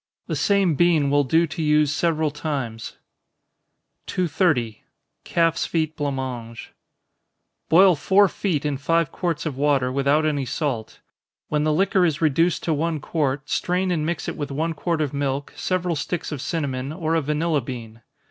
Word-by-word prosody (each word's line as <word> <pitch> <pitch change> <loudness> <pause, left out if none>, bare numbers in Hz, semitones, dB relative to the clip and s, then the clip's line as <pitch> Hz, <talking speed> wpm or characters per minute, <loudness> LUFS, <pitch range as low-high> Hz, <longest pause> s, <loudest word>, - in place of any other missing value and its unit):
The - - -3
same 200 -4 +2
bean 155 -3 +3
will 145 0 +4
do 165 +5 +3
to 165 +1 -6
use 150 -1 +3
several 160 -1 +1
times. 135 -7 -4 1.1
230. 155 - 0 0.4
Calf's 165 -1 +1
Feet 160 -1 -1
Blanc 145 -2 -2
Mange. 120 -3 -6 1.0
Boil 180 +3 +6
four 195 +7 +4
feet 170 -6 -2
in 145 -2 -1
five 165 +2 +1
quarts 170 -4 -2
of 145 -5 -3
water, 140 -3 +2
without 140 +3 +2
any 145 -3 0
salt. 125 -3 -3 0.5
When 150 0 0
the 155 - +2
liquor 190 +3 +2
is 160 -3 +1
reduced 165 +2 +2
to 165 - +1
one 160 +1 -1
quart, 140 -2 -2
strain 180 +3 0
and 160 -4 0
mix 165 +1 -2
it - - -3
with 145 -2 -4
one 160 +4 -1
quart 160 +1 -1
of 145 -3 -1
milk, 140 0 -2
several 180 -2 -1
sticks 165 +3 -3
of 145 -4 -4
cinnamon, 140 -5 -3
or 160 0 -2
a 165 - +2
vanilla 150 +1 0
bean. 115 -2 -8
150 Hz, 165 wpm, -23 LUFS, 140-170 Hz, 1.1 s, Boil